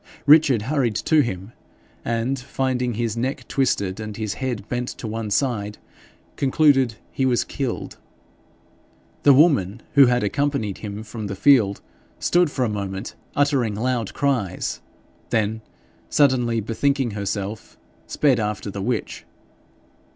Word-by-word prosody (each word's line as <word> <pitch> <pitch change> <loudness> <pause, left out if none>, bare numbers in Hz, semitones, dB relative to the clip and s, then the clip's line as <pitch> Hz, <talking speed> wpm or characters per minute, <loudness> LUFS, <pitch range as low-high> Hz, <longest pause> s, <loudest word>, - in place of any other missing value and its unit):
Richard 145 -6 +6
hurried 130 -4 0
to 155 +7 +3
him, 95 -4 -4 0.5
and 120 +3 -1
finding 125 -2 -2
his 115 -1 -1
neck 130 +4 -3
twisted 100 -8 0
and 110 -1 -6
his 110 -2 -2
head 125 -6 -4
bent 125 0 -2
to - - -7
one 110 0 -4
side, 105 -3 -1 0.6
concluded 135 -4 +3 0.2
he 135 - -2
was 125 -2 +2
killed. 135 -4 -4 1.2
The 145 - +6
woman 120 - +3
who 140 -3 +7
had 125 -1 +2
accompanied 125 -2 -1
him 105 0 -6
from 110 -1 -6
the 100 - -4
field 110 -5 +4 0.4
stood 175 -2 +2
for 130 -3 -1
a - - 0
moment 100 -2 -4 0.2
uttering 135 -7 +1
loud 120 -1 -2
cries, 125 -11 -1 0.5
then, 110 0 0 0.5
suddenly 125 -5 +2
bethinking 130 +3 0
herself, 100 +1 -4 0.3
sped 135 -5 +2
after 105 -1 -3
the 100 - -5
witch. 115 +3 -3
120 Hz, 130 wpm, -22 LUFS, 105-135 Hz, 1.2 s, who